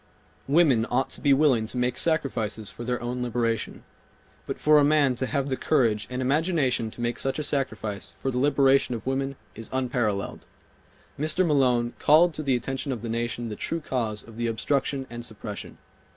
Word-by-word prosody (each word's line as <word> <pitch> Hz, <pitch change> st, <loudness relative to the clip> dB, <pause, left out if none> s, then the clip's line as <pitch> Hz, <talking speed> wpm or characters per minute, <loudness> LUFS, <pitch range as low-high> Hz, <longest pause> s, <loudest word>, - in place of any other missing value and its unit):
Women 135 Hz, -6 st, +4 dB
ought 125 Hz, +2 st, 0 dB
to -, -, -5 dB
be 140 Hz, -, +3 dB
willing 135 Hz, -6 st, +4 dB
to 125 Hz, -, -6 dB
make 125 Hz, 0 st, 0 dB
sacrifices 115 Hz, -10 st, -1 dB
for 120 Hz, -, -8 dB
their 125 Hz, +1 st, -1 dB
own 125 Hz, +1 st, -3 dB
liberation, 115 Hz, -1 st, -2 dB, 0.6 s
but -, -, -3 dB
for 150 Hz, 0 st, +5 dB
a -, -, +4 dB
man 145 Hz, -2 st, +4 dB
to 130 Hz, -, -1 dB
have 140 Hz, -1 st, -1 dB
the 130 Hz, -, 0 dB
courage 115 Hz, -8 st, +1 dB
and 125 Hz, 0 st, -3 dB
imagination 135 Hz, -5 st, +1 dB
to 120 Hz, -, -9 dB
make 120 Hz, 0 st, -1 dB
such 135 Hz, -1 st, -1 dB
a 150 Hz, -, -2 dB
sacrifice 110 Hz, -8 st, -3 dB
for 135 Hz, -, -4 dB
the 125 Hz, -, -1 dB
liberation 135 Hz, -2 st, +3 dB
of 115 Hz, -, -7 dB
women 135 Hz, +1 st, -1 dB, 0.2 s
is 115 Hz, -, -8 dB
unparalleled. 120 Hz, -6 st, -2 dB, 0.7 s
Mr. 155 Hz, +5 st, +3 dB
Malone 125 Hz, -6 st, +2 dB
called 165 Hz, +3 st, +5 dB
to 155 Hz, -, -4 dB
the 135 Hz, -4 st, +1 dB
attention 135 Hz, +3 st, -3 dB
of 120 Hz, -3 st, -4 dB
the 115 Hz, -, -4 dB
nation 120 Hz, 0 st, -2 dB
the 105 Hz, -, -5 dB
true 165 Hz, -, -2 dB
cause 115 Hz, -8 st, -3 dB
of 115 Hz, -1 st, -14 dB
the 120 Hz, 0 st, -1 dB
obstruction 135 Hz, +3 st, -1 dB
and 120 Hz, 0 st, -6 dB
suppression. 105 Hz, -2 st, -7 dB
125 Hz, 190 wpm, -26 LUFS, 115-140 Hz, 0.7 s, for